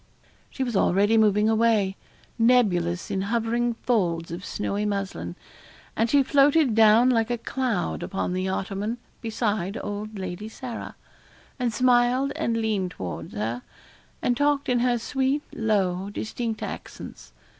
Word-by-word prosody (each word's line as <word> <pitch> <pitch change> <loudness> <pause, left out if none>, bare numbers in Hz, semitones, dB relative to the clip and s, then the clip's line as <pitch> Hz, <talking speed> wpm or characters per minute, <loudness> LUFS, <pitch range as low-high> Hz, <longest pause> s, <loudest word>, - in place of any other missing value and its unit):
She 265 - -3
was 240 -4 -3
already 200 +3 +3
moving 210 -1 +4
away, 220 -3 +2 0.4
nebulous 195 -8 +2
in 190 - 0
hovering 235 +3 0
folds 170 -9 0
of 175 +2 -6
snowy 205 0 -2
muslin. 195 - -3 0.6
And 225 +1 +1
she 280 +2 +4
floated 280 0 +4
down 225 +3 +6
like 225 -2 +1
a 240 - 0
cloud 235 -4 -2
upon 190 -2 -2
the 185 +1 -1
ottoman, 200 +4 -2 0.2
beside 215 -3 -1
old 205 +1 -5
Lady 190 +3 -5
Sarah, 240 +1 -7 0.6
and 245 -2 0
smiled 250 +3 +3
and 230 0 -1
leaned 215 -5 0
towards 85 - -7
her, 115 +4 -2 0.6
and 245 - +2
talked 285 +1 +1
in 245 -1 +3
her 245 0 +2
sweet, 265 +4 -1
low, 195 -4 0
distinct 220 +2 -4
accents. - - -8
220 Hz, 135 wpm, -25 LUFS, 195-240 Hz, 0.6 s, down